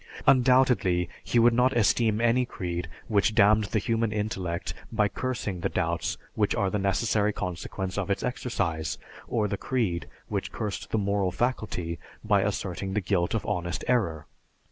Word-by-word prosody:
Undoubtedly, 125 -9 +4 0.2
He - - 0
would 120 0 +6
not 125 +1 +3
esteem 110 0 +3
any 120 +2 +3
creed 90 -7 -4 0.2
which 105 0 +2
damned 105 0 +5
the 110 - -1
human 115 +1 0
intellect 95 -5 -2 0.2
by 105 -2 +2
cursing 110 -5 -3
the 95 +3 -1
doubts 85 -1 -1 0.2
which 105 -2 +1
are 100 -2 +1
the 105 - 0
necessary 105 +2 +1
consequence 95 +1 -4
of 100 - -3
its 100 - 0
exercise, 100 - -2 0.3
or 110 -3 +1
the 100 - -2
creed 110 -10 -1 0.2
which - - -3
cursed 105 -3 -4
the - - 0
moral 100 -2 +1
faculty 90 - -2 0.2
by - - +3
asserting 95 -1 -2
the - - +3
guilt 90 0 0
of 110 - -2
honest 85 0 -2
error. 100 -12 +1
105 Hz, 160 wpm, -27 LUFS, 90-115 Hz, 0.3 s, would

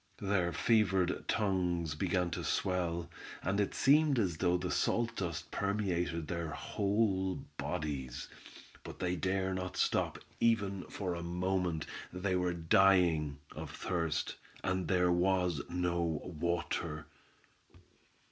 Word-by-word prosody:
Their 95 -3 +1
fevered 95 -6 +2
tongues 90 -6 +1
began 90 +2 0
to - - -3
swell, 85 -2 0 0.4
and 95 +3 0
it 100 - -1
seemed 145 0 +5
as 90 -8 +1
though 90 +1 +2
the 90 -2 -3
salt 115 +10 +1
dust 85 -5 -3
permeated 90 -5 -1
their 85 0 -2
whole 100 +2 0 0.2
bodies; 70 -5 -3 0.6
but - - -8
they 90 0 0
dare 95 +1 0
not 90 0 -4
stop, - - +1 0.2
even 100 -5 +2
for 95 -3 -3
a 85 - -4
moment, 90 -1 -1 0.3
they 90 +1 -1
were 90 0 +1
dying 85 -4 +4 0.2
of - - -6
thirst, 85 -4 -2 0.3
and 95 -2 0
there 90 0 +3
was 90 -3 +2
no 90 0 0 0.2
water. 85 -2 -2
90 Hz, 120 wpm, -33 LUFS, 85-95 Hz, 0.6 s, seemed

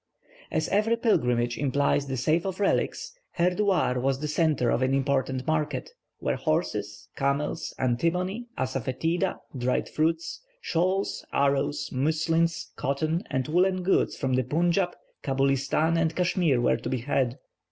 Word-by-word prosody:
As 155 -1 0
every 215 +3 +2
pilgrimage 120 - +1
implies 140 0 +1
the 135 -1 -2
sale 160 +8 +1
of 190 0 -4
relics, 205 - 0 0.2
Herdouar 180 -6 +2
was 135 +1 0
the 150 - -3
centre 150 -6 +1
of - - +1
an 130 +1 +2
important 135 -1 0
market, 150 -4 -1 0.3
where - - -1
horses, - - -2
camels, 140 +2 -1
antimony, 180 - 0
asafoetida, 135 - -1 0.2
dried 125 0 0
fruits, 165 - -1 0.2
shawls, 185 - 0
arrows, 140 +1 +1
muslins, 160 +4 0
cotton 155 +5 -1
and 130 -1 -1
woollen 185 +3 +2
goods 190 - +2
from 130 -2 -1
the 130 0 +2
Punjab, 175 +7 +1 0.3
Cabulistan, 135 +4 +1
and 165 -1 0
Cashmere, 175 -7 +2
were 120 - +3
to - - -5
be 130 -3 -1
had. 130 -1 0
150 Hz, 135 wpm, -27 LUFS, 130-175 Hz, 0.3 s, were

